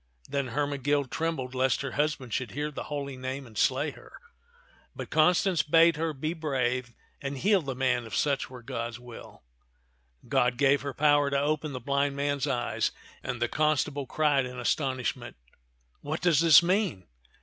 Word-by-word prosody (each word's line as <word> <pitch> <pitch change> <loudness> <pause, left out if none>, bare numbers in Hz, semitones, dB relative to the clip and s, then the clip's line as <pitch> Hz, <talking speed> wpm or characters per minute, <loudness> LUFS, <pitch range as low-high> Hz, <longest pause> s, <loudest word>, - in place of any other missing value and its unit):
Then 140 -1 -2
Hermegild 145 +1 -1
trembled 160 -6 -2
lest 130 0 +1
her 140 - -4
husband 145 -5 -1
should 120 -6 -2
hear 150 +3 -3
the - - -6
holy 140 -2 -4
name 130 +1 -5
and 110 -3 -15
slay - - +1
her; - - -16 0.8
but - - -7
Constance 175 +2 +3
bade 165 +2 +5
her 160 +1 -1
be 155 +3 -3
brave 125 -6 -2 0.3
and 140 -1 -4
heal 195 +5 +3
the 135 -4 -5
man 125 -2 0
if 110 - -5
such 140 -2 0
were 125 -2 -11
God's 115 0 -5
will. 120 - -12 0.8
God 125 0 +2
gave 140 +1 +3
her 140 - -4
the 135 - -8
power 145 -1 +4
to 140 0 +1
open 150 +1 -1
the 130 - -4
blind 140 +1 0
man's 140 0 -1
eyes; 120 -3 0 0.3
and 125 - -4
the 120 - +1
constable 145 -1 0
cried 145 -4 +2
in 125 0 -8
astonishment, 125 -2 -2 0.7
"What 155 +3 -4
does 170 -5 +4
this 165 -1 +8
mean 180 - 0
140 Hz, 170 wpm, -28 LUFS, 130-150 Hz, 0.8 s, this